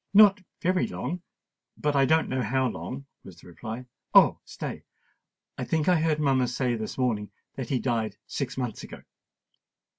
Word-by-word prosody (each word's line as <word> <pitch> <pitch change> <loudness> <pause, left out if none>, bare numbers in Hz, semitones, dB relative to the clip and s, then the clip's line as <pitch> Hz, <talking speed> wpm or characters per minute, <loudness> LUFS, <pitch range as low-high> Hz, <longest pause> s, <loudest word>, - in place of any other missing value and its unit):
"Not 205 -1 +8 0.2
very 185 +1 +2
long—but 145 - -5
I 135 -1 +5
don't 160 +4 +3
know 130 0 -1
how 130 +3 +1
long," 130 +3 -5 0.2
was 90 -3 -12
the - - -17
reply. 110 +7 -7 0.3
"Oh! - - +7
stay—I - - -10
think 160 -2 0
I 180 -3 +5
heard 155 -2 +2
mamma 135 -4 +3
say 125 0 0
this 110 -2 -4
morning 115 -5 0 0.2
that 130 -3 -5
he 135 - +2
died 115 -5 -1
six 135 -2 -4
months 125 -5 -3
ago." - - -10
130 Hz, 155 wpm, -27 LUFS, 115-150 Hz, 0.3 s, Not